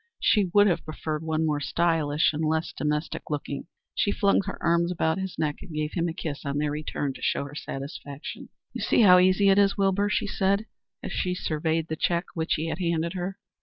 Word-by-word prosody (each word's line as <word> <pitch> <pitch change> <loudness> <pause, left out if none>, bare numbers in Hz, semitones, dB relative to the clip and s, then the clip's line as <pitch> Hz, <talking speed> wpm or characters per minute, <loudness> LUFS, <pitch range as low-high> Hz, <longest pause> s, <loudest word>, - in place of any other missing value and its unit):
She 205 -4 +3
would 205 +2 +6
have 185 -4 +1
preferred 155 -1 -4
one 160 0 0
more 150 -2 +1
stylish 160 -1 +1
and 155 +2 -2
less 160 +1 0
domestic 150 +1 -2
looking. 145 -1 -4 0.3
She 200 - +1
flung 200 -1 +3
her 200 - -5
arms 170 +1 +2
about 160 0 0
his 190 -1 -5
neck 150 -2 -1
and - - -10
gave 155 0 -2
him 170 -1 0
a 165 - -3
kiss 150 -5 -5
on 140 -1 -2
their 150 0 0
return 145 -2 -3
to - - -12
show - - 0
her 140 - -10
satisfaction. 140 0 -7 0.2
"You - - -5
see - - +3
how 180 -3 +8
easy 185 +2 +4
it 195 +1 +5
is, 200 -1 +3
Wilbur," 200 +1 +2
she 210 - 0
said 200 +1 +1 0.4
as - - -5
she 180 0 -1
surveyed 160 -1 -1
the 160 - -3
check 170 +3 0
which 160 -1 0
he 155 - -2
had - - -4
handed 170 -1 0
her. 185 +1 -4
165 Hz, 215 wpm, -26 LUFS, 150-185 Hz, 0.4 s, how